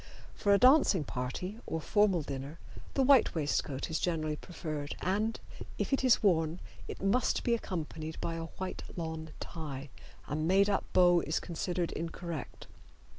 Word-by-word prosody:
For 205 - +1
a 200 - +7
dancing 255 - +5
party 140 - -4
or 160 - -2
formal 195 -1 +2
dinner 140 +3 -6 0.4
the 270 - +3
white 265 -6 +5
waistcoat 145 -3 -1
is 160 - 0
generally 155 -3 -1
preferred, 155 -3 -5
and, 210 +5 0 0.4
if - - -1
it 270 - +2
is 255 -3 +4
worn, 165 -3 +2 0.3
it - - -7
must 220 +6 +2
be 235 - +2
accompanied 160 -7 -4
by 165 - -2
a 165 0 -4
white 190 0 -4
lawn 160 -2 -4
tie. 145 -4 -6 0.4
A 145 - -2
made 190 +6 +3
up 200 - 0
bow 175 -1 +6
is 155 - -1
considered 175 0 -2
incorrect. 165 -2 -5
170 Hz, 155 wpm, -32 LUFS, 155-200 Hz, 0.4 s, a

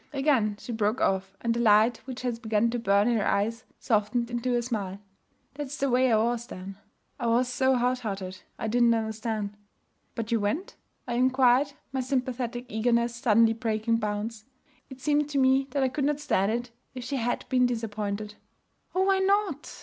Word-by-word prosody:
Again 265 -7 +2
she 240 - -8
broke 220 +2 0
off, 190 0 0
and 230 -1 +1
the 235 - -2
light 225 +1 +5
which 255 -1 -6
had 240 -2 -2
begun 220 0 +1
to 240 - -2
burn 200 -1 +3
in 240 -1 +2
her 210 - 0
eyes 225 +4 0
softened 235 +2 0
into 245 +1 0
a 240 - +2
smile. 205 -6 -3 0.6
'That's 285 0 -5
the 275 -1 0
way 255 0 +3
I 220 - +5
was 235 +2 0
then. 190 +1 -8 0.4
I 240 - -1
was 240 +2 +3
so 260 +1 +2
hot 250 +1 +1
hearted. 195 -5 -5 0.2
I - - -3
didn't 235 +1 +4
understand.' 220 -2 -3 0.6
'But 230 0 -4
you 230 - +3
went?' 215 - -2 0.3
I 240 - -2
inquired, 260 +2 +3 0.2
my 265 - 0
sympathetic 250 -2 -2
eagerness 235 +1 +1
suddenly 225 -1 +4
breaking 225 0 0
bounds. 215 +1 -3 0.4
It 265 -1 -10
seemed 295 +1 +1
to 290 - -2
me 265 0 +3
that 270 +1 0
I - - +3
could 270 +2 -2
not 295 0 0
stand 220 -9 +1
it 240 +1 -3 0.2
if 250 - -5
she 275 +3 -3
had 245 0 -2
been 250 -1 +3
disappointed. 210 -3 -3 0.6
'Oh! 375 - +3
why 385 0 +3
not?' 385 -6 +1
235 Hz, 190 wpm, -27 LUFS, 215-255 Hz, 0.6 s, light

